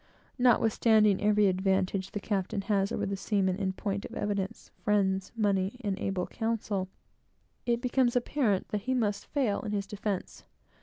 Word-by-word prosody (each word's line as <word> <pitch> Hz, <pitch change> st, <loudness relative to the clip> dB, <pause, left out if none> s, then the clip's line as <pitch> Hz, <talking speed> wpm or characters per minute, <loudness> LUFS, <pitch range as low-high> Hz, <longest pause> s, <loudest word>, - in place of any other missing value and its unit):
Notwithstanding 220 Hz, -4 st, +4 dB
every 210 Hz, 0 st, +4 dB
advantage 190 Hz, 0 st, +1 dB
the 210 Hz, -, -4 dB
captain 195 Hz, -1 st, -2 dB
has 195 Hz, -1 st, +1 dB
over -, -, -1 dB
the 195 Hz, -, -2 dB
seaman 190 Hz, -2 st, 0 dB
in 190 Hz, -2 st, -1 dB
point 200 Hz, 0 st, -3 dB
of -, -, -9 dB
evidence, 200 Hz, -2 st, -3 dB
friends, 190 Hz, -2 st, +1 dB
money, 200 Hz, 0 st, +1 dB
and 200 Hz, -4 st, -1 dB
able 190 Hz, -2 st, -1 dB
counsel, 220 Hz, -4 st, -2 dB, 0.8 s
it 235 Hz, 0 st, +1 dB
becomes 250 Hz, -1 st, +2 dB
apparent 240 Hz, -5 st, +1 dB
that 210 Hz, -, -2 dB
he 260 Hz, +4 st, -1 dB
must 210 Hz, -4 st, -1 dB
fail 260 Hz, -8 st, 0 dB
in 210 Hz, -, -4 dB
his 200 Hz, -1 st, -1 dB
defence. 205 Hz, -2 st, -4 dB
205 Hz, 155 wpm, -29 LUFS, 195-225 Hz, 0.8 s, Notwithstanding